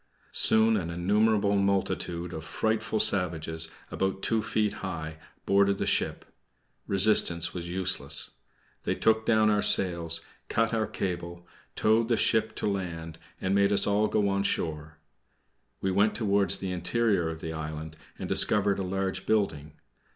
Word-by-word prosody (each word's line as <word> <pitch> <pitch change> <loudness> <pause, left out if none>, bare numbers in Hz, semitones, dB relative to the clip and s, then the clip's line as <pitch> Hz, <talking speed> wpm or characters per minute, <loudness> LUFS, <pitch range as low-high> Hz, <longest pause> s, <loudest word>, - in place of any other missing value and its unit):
Soon 110 0 +4
an 85 -4 -4
innumerable 100 +4 +1
multitude 95 -3 -1
of 80 - -7
frightful 110 +3 -2
savages, 80 -4 +2 0.2
about 95 0 -3
two 115 -1 0
feet 110 -1 -1
high, 80 -5 -6 0.3
boarded 100 0 +2
the - - -2
ship. - - -1 0.6
Resistance 95 -4 +3
was 85 -1 -6
useless. 95 +1 -1 0.5
They - - -2
took 110 0 +1
down 110 -2 +3
our 105 -1 +1
sails, 85 -5 +4 0.3
cut 115 +1 0
our 110 -1 0
cable, 85 -2 -5 0.3
towed 110 +1 +2
the 115 -1 +1
ship 110 -1 +1
to - - -3
land, 85 -5 -5 0.2
and 95 - -2
made 100 0 +2
us 100 - +4
all 105 +1 +1
go 105 -1 0
on 100 0 0
shore. 80 -4 -3 0.8
We 95 - -1
went 100 +3 +2
towards 100 -4 +1
the 95 -1 -5
interior 90 0 0
of 80 -1 -7
the 80 0 -6
island 80 0 -7 0.2
and - - -6
discovered 100 -1 +3
a - - -2
large 95 0 -3
building. 80 -9 -1
95 Hz, 150 wpm, -27 LUFS, 85-105 Hz, 0.8 s, Soon